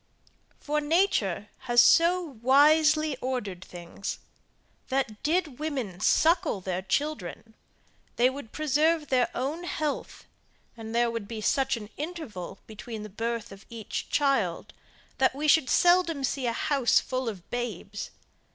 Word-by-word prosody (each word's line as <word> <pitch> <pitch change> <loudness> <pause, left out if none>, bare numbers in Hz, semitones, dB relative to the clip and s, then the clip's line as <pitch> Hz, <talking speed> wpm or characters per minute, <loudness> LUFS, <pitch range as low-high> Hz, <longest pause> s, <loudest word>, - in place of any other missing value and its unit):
For 300 0 -1
nature 290 - +1 0.2
has 240 0 +4
so 345 +8 +5 0.2
wisely 305 +3 +4
ordered 210 -9 -4
things, 175 +2 -7 0.7
that 260 -6 -2
did 315 -4 0
women 260 - -3
suckle 330 - +3
their 185 -1 -3
children, 225 - -3 0.6
they 245 - +4
would 260 -4 -6
preserve 310 +1 +1
their 255 -2 +2
own 285 +7 -3
health, 310 -4 -4 0.5
and 225 0 -7
there 235 0 +2
would 230 -3 -5
be 225 0 -6
such 265 +4 +1
an 210 -1 -10
interval 290 - -6
between 220 0 -8
the 215 - -8
birth 230 +2 -4
of 195 0 -12
each 230 -3 -5
child, 235 -12 0 0.5
that 260 0 +3
we 300 +2 -2
should 300 -3 +4
seldom 350 -5 +3
see 265 0 -1
a - - +1
house 270 +1 +2
full 255 -2 -3
of 185 -6 -9
babes. 215 -4 -4
255 Hz, 135 wpm, -27 LUFS, 215-305 Hz, 0.7 s, so